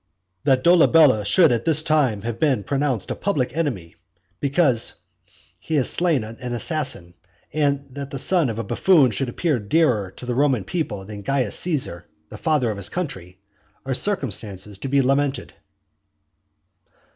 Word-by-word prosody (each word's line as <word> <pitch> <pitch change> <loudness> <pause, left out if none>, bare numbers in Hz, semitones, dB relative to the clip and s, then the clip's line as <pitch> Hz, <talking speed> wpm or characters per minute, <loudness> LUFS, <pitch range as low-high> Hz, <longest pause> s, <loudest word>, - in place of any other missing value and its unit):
"That 130 -2 +3
Dolabella 160 -9 +5
should 160 - +4
at 120 -1 0
this 155 -1 +2
time 140 -10 +1
have 115 0 -4
been 135 -9 +1
pronounced 135 -3 -1
a - - -2
public 140 -10 -2
enemy 120 - -3 0.4
because 140 - +2 0.6
he 160 - -4
has 135 -4 +2
slain 165 -9 +1
an 120 +3 -7
assassin; 120 - -3 0.4
and 140 -2 0
that 140 +1 -7
the 135 - -5
son 165 0 +2
of 110 - -5
a 115 - -3
buffoon 145 - +3
should 120 +5 -2
appear 150 +1 -1
dearer 110 - +1
to - - -9
the 125 - -2
Roman 130 -4 +1
people 105 - -4
than 105 0 -8
Caius 130 -1 -1
Caesar, 130 - -1 0.2
the - - -10
father 150 -8 +1
of 105 - -6
his 100 - -1
country, 95 - -6 0.5
are 135 - -1
circumstances 105 - -2
to 135 - -5
be 140 0 +2
lamented." 140 +1 0
135 Hz, 155 wpm, -22 LUFS, 110-150 Hz, 0.6 s, Dolabella